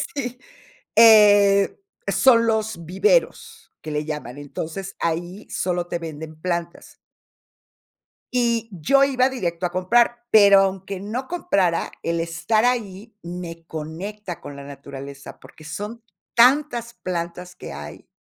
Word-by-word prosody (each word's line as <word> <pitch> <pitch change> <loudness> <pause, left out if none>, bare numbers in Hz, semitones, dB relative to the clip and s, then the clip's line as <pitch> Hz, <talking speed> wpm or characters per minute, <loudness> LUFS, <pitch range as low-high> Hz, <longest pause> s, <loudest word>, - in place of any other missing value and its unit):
Sí, 250 -3 -4 0.6
eh, 205 -3 +6 0.3
son 235 -3 +5
los 220 -6 -1
viveros 455 - 0
que 155 - -7
le 150 0 -2
llaman, 145 -4 -6
entonces 165 +6 -6
ahí 175 +5 -3
solo 175 -1 -2
te 175 - -3
venden 160 -1 -8
plantas. 170 0 -4 1.4
Y 235 -2 +1
yo 190 - +3
iba 260 -2 +3
directo 180 -9 -3
a 175 - -2
comprar, 235 +6 +2
pero 200 -2 +8
aunque 195 0 -2
no 230 +7 -4
comprara, 195 - 0
el 170 0 -1
estar 170 +7 0
ahí 225 -3 -2
me 170 -1 -7
conecta 175 +4 -7
con 145 - -9
la 140 - -9
naturaleza, 140 0 -10
porque 155 - -16
son 210 +8 -7 0.3
tantas 240 -1 +3
plantas 180 0 -5
que - - -9
hay, 75 +1 -10
190 Hz, 125 wpm, -22 LUFS, 165-230 Hz, 1.4 s, pero